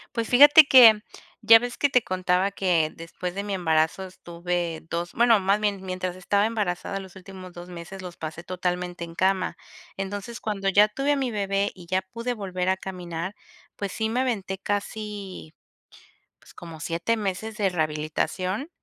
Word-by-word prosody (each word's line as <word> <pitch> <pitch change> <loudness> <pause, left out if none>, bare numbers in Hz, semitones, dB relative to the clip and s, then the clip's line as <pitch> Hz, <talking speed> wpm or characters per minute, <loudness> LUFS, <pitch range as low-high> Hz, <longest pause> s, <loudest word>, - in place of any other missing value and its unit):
Pues, 230 -1 -2
fíjate 290 +5 +9
que, 240 -7 +8 0.4
ya 225 0 +9
ves 245 0 -5
que 285 - +2
te 250 -3 +3
contaba 185 0 0
que, 175 -6 +1
después 175 +2 -6
de 200 +1 -4
mi 205 -1 -3
embarazo 160 0 +1
estuve 175 -2 -4
2 170 +1 -3
bueno, 235 -1 +4
más 200 +2 +1
bien, 205 -2 -1
mientras 185 -1 -4
estaba 200 +3 +1
embarazada, 195 -4 -2
los 190 -2 -11
últimos 190 -1 -11
2 175 0 -10
meses 180 +2 -9
los 180 -1 -8
pasé 160 +1 -7
totalmente 180 -1 -3
en 165 0 -10
cama. 190 +1 0 0.4
Entonces, 205 +4 -5
cuando 195 -2 -2
ya 205 +2 +5
tuve 275 +7 0
a - - +1
mi 265 -3 -1
bebé 200 -1 -1
y 180 -2 -13
ya 185 +2 0
pude 230 +6 -5
volver 185 -4 -3
a 190 - +1
caminar, 180 -1 -6 0.4
pues 200 -2 -4
sí 220 -1 -2
me 240 +3 0
aventé 200 -7 -2
casi, 205 -4 -5 0.9
pues - - -19
como 165 -2 -10
7 170 +8 -1
meses 210 +1 -4
de 200 -3 +1
rehabilitación, 175 - -2
190 Hz, 170 wpm, -25 LUFS, 180-210 Hz, 0.9 s, fíjate